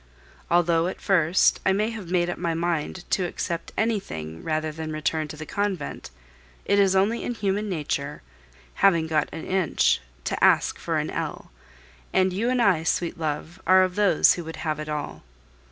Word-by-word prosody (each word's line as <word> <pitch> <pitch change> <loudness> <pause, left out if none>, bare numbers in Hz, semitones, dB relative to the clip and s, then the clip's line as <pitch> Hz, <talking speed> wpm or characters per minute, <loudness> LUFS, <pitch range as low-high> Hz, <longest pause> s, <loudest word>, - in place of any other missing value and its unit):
Although, 170 -1 +3
at 185 - -5
first, 180 -2 +3
I 190 - +3
may 215 +3 0
have 210 -7 -7
made 175 -1 +2
up 175 - -4
my 170 -2 -1
mind 170 +1 -2
to 185 -2 +1
accept 170 -1 -4
anything 80 - -2
rather 155 -1 -1
than 155 0 -6
return 155 0 -1
to 150 - -9
the 155 - -7
convent, 200 -4 -3 0.6
it 200 0 +3
is 195 -1 +4
only 205 +5 +2
in 245 - -3
human 205 0 -1
nature, 150 - -3 0.6
having 170 -5 +5
got 155 -2 0
an 160 +1 -7
inch, 185 -5 +2 0.2
to - - -2
ask - - +4
for - - -1
an - - -2
ell, - - -5 0.6
and 185 -1 +2
you 225 +6 0
and 250 -1 +2
I, 190 -7 +3
sweet 165 +1 -1
love, 160 +3 -4
are 185 0 +7
of 185 -1 -1
those 205 +1 +4
who 175 - -5
would 160 0 -7
have 155 -1 -1
it 155 0 -5
all. 150 -1 -4
175 Hz, 185 wpm, -25 LUFS, 155-195 Hz, 0.6 s, are